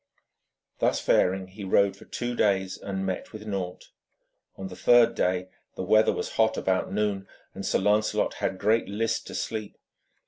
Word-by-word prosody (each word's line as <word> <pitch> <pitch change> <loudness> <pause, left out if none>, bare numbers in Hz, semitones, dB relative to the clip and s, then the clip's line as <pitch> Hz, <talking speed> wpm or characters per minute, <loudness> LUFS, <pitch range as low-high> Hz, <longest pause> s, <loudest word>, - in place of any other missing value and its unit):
Thus - - +2
faring, 95 0 +2
he 100 +2 -10
rode 100 +1 +3
for - - -15
two 120 0 -4
days 95 -4 +1
and 95 -1 -4
met 95 -1 -4
with 110 -1 -9
naught. 95 -4 -5 0.7
On 95 - -5
the 95 - -9
third 120 +2 +5
day 90 0 0 0.3
the - - -4
weather 110 0 +4
was - - -5
hot 110 0 +3
about 95 -1 0
noon, 100 -2 -1 0.3
and - - -7
Sir - - +1
Lancelot 105 +1 +1
had 95 - -1
great 110 +3 +1
list 110 +3 -1
to - - -7
sleep. 110 -2 -4
100 Hz, 170 wpm, -27 LUFS, 95-110 Hz, 0.7 s, third